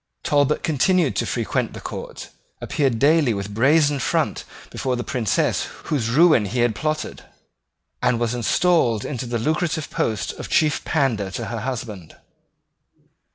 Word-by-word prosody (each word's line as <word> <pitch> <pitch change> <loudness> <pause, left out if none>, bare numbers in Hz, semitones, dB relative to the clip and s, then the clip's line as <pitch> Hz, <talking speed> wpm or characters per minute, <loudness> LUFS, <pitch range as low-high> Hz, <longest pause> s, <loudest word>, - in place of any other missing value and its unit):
Talbot 145 0 +2
continued 165 0 +2
to - - 0
frequent - - -1
the - - -7
court, - - -7 0.3
appeared 135 -6 0
daily 145 -2 +3
with 100 +1 -5
brazen 145 +5 +3
front - - -1 0.3
before 130 -1 -2
the 120 - -3
princess 115 -6 0 0.2
whose 125 -7 0
ruin 155 -3 +5
he 120 +5 -1
had 120 -2 +2
plotted, 155 +7 -3 0.8
and 125 -2 +2
was 120 0 0
installed 120 - +2
into 130 -3 -4
the 120 0 -1
lucrative 155 +5 -1
post 110 -3 -1
of - - -6
chief 155 -2 +2
pandar 120 - 0
to 115 +4 -5
her 115 +1 -4
husband. 110 -8 -6
125 Hz, 145 wpm, -22 LUFS, 115-150 Hz, 0.8 s, ruin